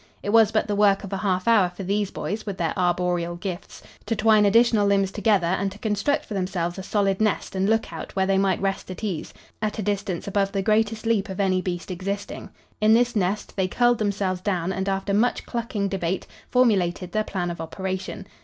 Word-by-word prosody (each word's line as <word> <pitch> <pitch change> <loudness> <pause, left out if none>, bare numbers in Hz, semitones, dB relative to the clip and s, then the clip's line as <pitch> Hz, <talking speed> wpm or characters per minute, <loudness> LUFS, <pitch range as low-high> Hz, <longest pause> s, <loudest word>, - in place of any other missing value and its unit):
It - - -3
was 225 -1 +6
but 215 - +1
the 205 - -1
work 200 -1 +3
of 200 0 -6
a - - 0
half 185 -1 -1
hour 210 -6 +5
for 180 +2 -8
these 200 +1 0
boys, 210 +2 -4
with 200 -3 -5
their 165 -2 -1
arboreal 175 -1 0
gifts, 180 0 -7 0.2
to 225 - 0
twine 215 -1 +4
additional 225 -1 +4
limbs 195 -1 +2
together 205 -3 +2
and 190 +3 0
to 200 - -11
construct 215 +7 0
for - - -7
themselves 185 -2 -2
a - - -3
solid 195 0 0
nest 215 -3 0
and 190 +2 +1
lookout 220 -8 -2
where 190 -1 +2
they 195 0 +2
might 195 -2 +1
rest 195 -1 -2
at 185 +4 -7
ease, 190 -7 -3 0.3
at 215 0 -2
a 215 - -2
distance 195 -3 -2
above 195 0 0
the 195 -1 0
greatest 220 +1 +1
leap 220 -3 +1
of 190 - -6
any 185 -2 +2
beast 180 0 -4
existing. 200 +3 -5 0.3
In 215 +1 +6
this 240 0 +2
nest 200 +1 -1
they 190 -2 +1
curled 240 +4 +2
themselves 200 -3 -1
down 185 -2 -1
and, 190 +1 -2
after 195 +1 -1
much 230 +5 +1
clucking 225 -4 -2
debate, 185 -1 -2 0.2
formulated 190 -8 +2
their 215 0 +1
plan 180 -4 -3
of 170 - -6
operation. 190 +3 -5
195 Hz, 210 wpm, -24 LUFS, 185-215 Hz, 0.3 s, was